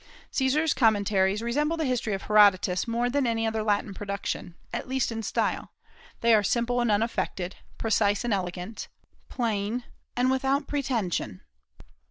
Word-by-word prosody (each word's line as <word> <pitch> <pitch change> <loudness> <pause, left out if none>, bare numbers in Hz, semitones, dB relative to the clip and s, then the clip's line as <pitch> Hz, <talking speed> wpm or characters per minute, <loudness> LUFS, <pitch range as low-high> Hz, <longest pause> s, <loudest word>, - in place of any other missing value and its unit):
Caesar's 285 +3 +2
"Commentaries" 205 -4 +2
resemble 295 +7 0
the 320 - -1
history 245 -5 0
of 195 - -7
Herodotus 200 -2 +4
more 235 +1 0
than 265 +1 +1
any 225 -1 0
other 220 0 -1
Latin 205 -1 0
production, 200 -3 -4 0.2
at - - -3
least 260 -2 0
in 225 0 -3
style; 215 - -2 0.5
they 230 0 +5
are 215 - +6
simple 240 +3 +1
and 240 - +1
unaffected, 205 -4 -1 0.2
precise 205 -2 +1
and 240 -3 0
elegant, 180 +2 -4 0.4
plain 225 -1 -1 0.3
and 250 +1 +2
without 270 +2 +1
pretension. 225 - -2
225 Hz, 145 wpm, -27 LUFS, 200-250 Hz, 0.5 s, are